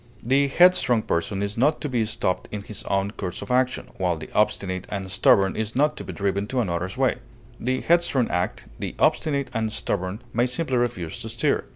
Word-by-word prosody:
The 135 Hz, +4 st, +3 dB
headstrong 140 Hz, -7 st, +4 dB
person 95 Hz, +4 st, -1 dB
is 100 Hz, +2 st, -3 dB
not 150 Hz, +5 st, +3 dB
to -, -, -1 dB
be 120 Hz, -5 st, 0 dB
stopped 110 Hz, -4 st, -1 dB
in 105 Hz, -1 st, -5 dB
his 105 Hz, -, -6 dB
own 100 Hz, 0 st, 0 dB
course 95 Hz, -4 st, -5 dB
of -, -, -6 dB
action, 130 Hz, 0 st, +1 dB
while 90 Hz, -3 st, +1 dB
the 80 Hz, -, -9 dB
obstinate 95 Hz, -3 st, 0 dB
and 95 Hz, -2 st, -4 dB
stubborn 95 Hz, 0 st, +4 dB
is 110 Hz, 0 st, -3 dB
not 150 Hz, +3 st, +3 dB
to -, -, -5 dB
be -, -, -6 dB
driven 100 Hz, 0 st, -1 dB
to 130 Hz, +2 st, -1 dB
another's 90 Hz, -1 st, -2 dB
way. 130 Hz, -1 st, +2 dB, 0.4 s
The 130 Hz, +2 st, -1 dB
headstrong 170 Hz, -7 st, +2 dB
act; 90 Hz, +1 st, -2 dB
the -, -, -4 dB
obstinate 140 Hz, -4 st, +1 dB
and 110 Hz, -2 st, -1 dB
stubborn 95 Hz, 0 st, -3 dB
may 120 Hz, +2 st, +2 dB
simply 130 Hz, 0 st, -1 dB
refuse 115 Hz, -5 st, -2 dB
to 115 Hz, -, -5 dB
stir. 115 Hz, +1 st, 0 dB
110 Hz, 200 wpm, -24 LUFS, 95-130 Hz, 0.4 s, headstrong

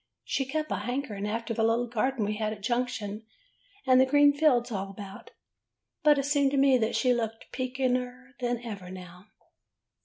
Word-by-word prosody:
She 270 Hz, -, -1 dB
kept 305 Hz, +3 st, -3 dB
a -, -, 0 dB
hankering 210 Hz, -2 st, -3 dB
after 230 Hz, +2 st, -3 dB
the 225 Hz, -, 0 dB
little 230 Hz, +2 st, +2 dB
garden 240 Hz, 0 st, -1 dB
we 210 Hz, +1 st, -2 dB
had 215 Hz, -1 st, -1 dB
at 205 Hz, -2 st, -12 dB
Junction, 225 Hz, -3 st, -2 dB, 0.6 s
and 255 Hz, -1 st, +6 dB
the -, -, +5 dB
green 290 Hz, +1 st, +5 dB
fields 260 Hz, -5 st, +2 dB
all 195 Hz, -2 st, -3 dB
about. 195 Hz, 0 st, -10 dB, 0.7 s
But 300 Hz, -1 st, +5 dB
it 275 Hz, -, 0 dB
seemed 285 Hz, -1 st, +3 dB
to -, -, +1 dB
me 270 Hz, -2 st, +5 dB
that 220 Hz, -1 st, 0 dB
she 255 Hz, -2 st, +3 dB
looked 225 Hz, -2 st, -4 dB
peekeder 255 Hz, 0 st, -2 dB
than 240 Hz, -1 st, -2 dB
ever 200 Hz, -6 st, -7 dB
now. 180 Hz, +1 st, -11 dB
245 Hz, 180 wpm, -28 LUFS, 215-265 Hz, 0.7 s, and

